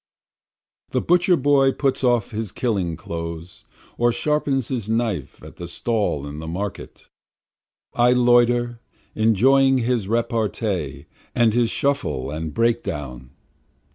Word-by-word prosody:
12 -, -, -29 dB
The -, -, 0 dB
butcher 180 Hz, +1 st, +4 dB
boy 135 Hz, -1 st, +3 dB
puts 135 Hz, -2 st, -1 dB
off 120 Hz, -4 st, +2 dB
his 110 Hz, -2 st, -4 dB
killing 95 Hz, -9 st, -1 dB
clothes, 85 Hz, +1 st, -7 dB, 0.3 s
or 120 Hz, 0 st, +3 dB
sharpens 140 Hz, -2 st, 0 dB
his 115 Hz, -5 st, -3 dB
knife 110 Hz, -, -2 dB
at -, -, -12 dB
the 85 Hz, -, -7 dB
stall 100 Hz, -7 st, -1 dB
in 75 Hz, +1 st, -7 dB
the 80 Hz, -, -7 dB
market, 95 Hz, +5 st, -6 dB, 0.9 s
I 120 Hz, +1 st, +4 dB
loiter 120 Hz, -1 st, +3 dB, 0.3 s
enjoying 130 Hz, +5 st, +4 dB
his 120 Hz, -4 st, 0 dB
repartee 110 Hz, -, -2 dB, 0.3 s
and 115 Hz, -3 st, +3 dB
his 120 Hz, -1 st, +2 dB
shuffle 75 Hz, -, -1 dB
and 80 Hz, +1 st, -4 dB
break 115 Hz, +3 st, +1 dB
down. 65 Hz, -5 st, -6 dB
115 Hz, 130 wpm, -22 LUFS, 85-125 Hz, 0.9 s, butcher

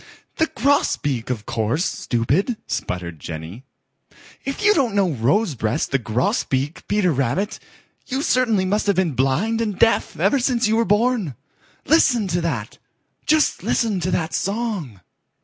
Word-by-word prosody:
"The 320 Hz, -, +2 dB
Grosbeak, 145 Hz, -, 0 dB
of 110 Hz, -5 st, -3 dB
course, 115 Hz, -, -1 dB
stupid," 145 Hz, -, 0 dB
sputtered 85 Hz, -3 st, -4 dB
Jenny. 80 Hz, -, -8 dB, 0.8 s
"If 275 Hz, +9 st, -4 dB
you 420 Hz, -1 st, +6 dB
don't 255 Hz, -, +1 dB
know 195 Hz, -4 st, +2 dB
Rosebreast 130 Hz, -, 0 dB
the 135 Hz, -, +2 dB
Grosbeak, 130 Hz, +5 st, -1 dB
Peter 205 Hz, -4 st, +2 dB
Rabbit, 140 Hz, -, -1 dB, 0.5 s
you 265 Hz, +2 st, -2 dB
certainly 230 Hz, -9 st, +2 dB
must 205 Hz, +3 st, 0 dB
have 200 Hz, -, +3 dB
been 180 Hz, -3 st, +1 dB
blind 155 Hz, -, +1 dB
and 210 Hz, -4 st, -2 dB
deaf 230 Hz, -, +2 dB
ever 280 Hz, -, +3 dB
since 240 Hz, -2 st, +1 dB
you 220 Hz, -, +2 dB
were 230 Hz, +1 st, +2 dB
born. 210 Hz, -, +1 dB, 0.5 s
Listen 245 Hz, -9 st, +3 dB
to 175 Hz, 0 st, 0 dB
that! 125 Hz, -11 st, -3 dB, 0.5 s
Just 310 Hz, -1 st, +2 dB
listen 220 Hz, -5 st, 0 dB
to 175 Hz, +1 st, -2 dB
that 160 Hz, -3 st, -1 dB
song!" 195 Hz, -, -3 dB
185 Hz, 145 wpm, -21 LUFS, -, 0.8 s, you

